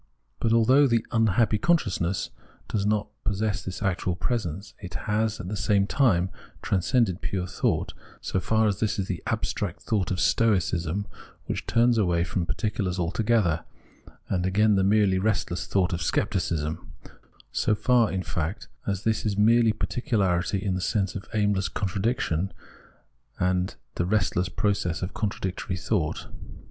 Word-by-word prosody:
But 115 - +1
although 130 +5 +5
the 115 -3 +1
" - - -32
unhappy 110 -1 +3
consciousness 95 - +1 0.2
" - - -30
does 100 -1 0
not 105 0 0
possess 105 -1 -1
this 90 -2 -5
actual 90 -1 0
presence, 100 - -3
it 90 -3 -8
has, 105 +3 -1
at 90 - -6
the 105 - -3
same 100 -1 +2
time, 100 -8 +2 0.3
transcended 100 0 +1
pure 90 +1 -2
thought, - - -1 0.3
so 95 - -1
far 110 +3 +2
as 100 -3 0
this 110 -2 0
is 100 - -1
the 90 -5 -3
abstract - - -2
thought 100 -5 0
of 95 - -1
Stoicism, 95 -4 +1 0.4
Avhich - - -3
turns 120 0 +3
away 85 -4 +2
from 85 0 -2
particulars 105 -5 -1
altogether, 90 -1 +1 0.6
and 90 -2 0
again 105 +3 +3
the 95 -1 +3
merely 100 -1 +3
restless 95 -3 -1
thought 95 -2 +1
of 85 - -2
Scepticism 75 0 -1 0.3
— - - -30 0.3
so 105 - +1
far, 120 0 +3
in 95 -1 -2
fact, 90 +6 -3 0.2
as 100 -1 -1
this 110 -1 +1
is 105 -2 -1
merely 115 +2 +5
particu 120 +5 -4
larity 95 0 +1
in 95 -1 -1
the 90 - -2
sense 95 +1 0
of 100 - -7
aimless 105 -3 +1
contradiction 95 -2 -1 0.9
and 90 0 0 0.2
the 85 - -1
restless 95 -3 +1
process 90 -3 -1
of 90 - -4
contradictory 95 -3 -3
thought. 85 -3 -1
100 Hz, 155 wpm, -26 LUFS, 90-110 Hz, 0.9 s, although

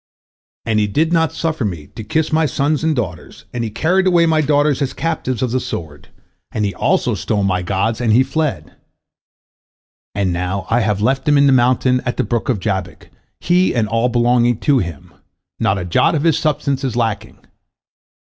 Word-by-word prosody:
And 110 -1 +1
he 105 - +1
did 160 +11 0
not 160 -2 +2
suffer 160 -4 -2
me 85 -8 -4
to 110 - -6
kiss 160 +6 -1
my 160 0 +3
sons 145 +2 0
and 160 -1 +1
daughters, 90 - -5
and 120 -1 -2
he 115 - -2
carried 180 - +1
away 175 -2 +4
my 160 -1 +2
daughters 145 -1 +1
as 135 - -1
captives 130 -7 -2
of 125 - -1
the 130 - +1
sword, 75 - -7 0.4
and 105 - -1
he 100 - -2
also - - +1
stole 105 -2 -1
my 95 -2 0
gods, 100 +6 -1
and 115 -2 +1
he 120 +4 +5
fled. 135 - -3 1.4
And 95 -3 0
now 90 +2 -3
I 115 - +3
have 105 -3 0
left 135 +4 0
him 145 - +4
in 140 - +5
the 135 - +5
mountain 125 0 +3
of 125 -1 -3
the - - 0
brook 115 +3 -2
of 120 -6 +1
Jabbok, 95 -2 -4 0.3
he 180 -2 +2
and 115 -3 +1
all 115 +3 +1
belonging 120 0 +2
to 140 -3 +3
him, 85 - -6 0.5
not 100 - +1
a 90 - -4
jot 90 - +2
of 150 - -1
his 165 -2 +2
substance 140 -3 -1
is 130 -4 -2
lacking. 110 -3 -2
120 Hz, 195 wpm, -18 LUFS, 105-150 Hz, 1.4 s, he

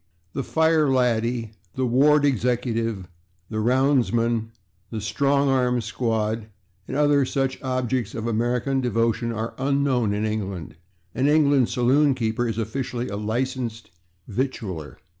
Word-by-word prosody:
The - - -2
/fire 160 0 +2
laddie/, 120 -2 +1 0.2
the 130 - 0
/ward 145 +5 +4
executive/, 115 -6 0 0.4
the 110 - -3
/roundsman/, 120 -2 +2 0.4
the 115 - -5
/strong 140 +6 +1
arm 125 -2 +2
squad/ 110 -1 -2 0.4
and 135 - -3
other 145 -1 +4
such 135 0 -1
objects 130 -3 -2
of 110 0 -4
American 120 +4 0
devotion 115 -1 0
are 115 0 -4
unknown 135 -5 +1
in 105 +1 -1
England. 100 -6 -4 0.4
An 130 +2 +1
English 145 -4 +3
saloon 135 +3 +3
keeper 120 0 -1
is 115 -2 -3
officially 120 +2 -3
a 100 - -4
licensed 115 +1 -3 0.4
/victualler 100 - -4
120 Hz, 125 wpm, -24 LUFS, 110-135 Hz, 0.4 s, ward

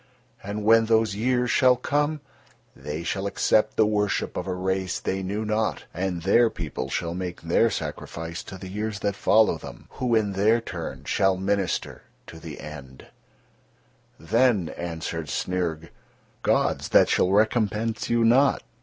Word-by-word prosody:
And 105 +1 -5
when 115 +1 +6
those 110 -2 +3
years 125 +3 0
shall 130 -2 +5
come, 145 +4 -1 0.5
they 75 +4 -6
shall 95 +3 -2
accept 105 +2 +1
the 110 - +5
worship 105 -1 0
of - - -4
a 95 - -1
race 95 0 -2
they 95 0 -2
knew 100 +3 -3
not, 110 0 -1
and 90 -2 -3
their 115 +5 +4
people 75 -7 -5
shall 85 +4 -2
make 90 -1 -5
their 85 +8 +3
sacrifice 85 -4 -5
to 95 - -8
the 95 - -9
years 105 +2 -4
that 100 -1 -1
follow 110 +1 +3
them, - - -11
who, 120 -2 0
in 105 -2 +1
their 105 +4 +3
turn, 90 -7 -7
shall 95 -1 +1
minister 95 -1 -1 0.2
to - - -11
the - - -9
End." 70 -3 -10 1.1
Then 110 -2 +2
answered 80 -2 -5
Snyrg: 85 -1 -2 0.5
"Gods - - +1
that - - +6
shall 90 - +2
recompense 110 +2 +1
you 120 0 +2
not. 135 +4 +4
100 Hz, 155 wpm, -25 LUFS, 90-110 Hz, 1.1 s, when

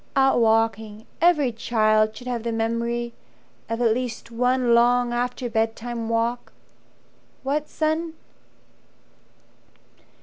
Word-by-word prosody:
"Out 270 -2 +4
walking. 225 -1 +1 0.2
Every 310 -7 +4
child 215 -1 +1
should 250 - -10
have 245 -2 -3
the 235 +1 -3
memory 235 +1 -2 0.6
Of 230 +1 -2
at 225 -2 +4
least 235 -1 -5
one 250 +1 +2
long 240 +1 +3
after 245 +1 -2
bedtime 225 0 -2
walk. 230 +1 -1 0.9
What, 290 +3 -1
son?" 315 +1 -1
235 Hz, 105 wpm, -23 LUFS, 225-250 Hz, 0.9 s, Out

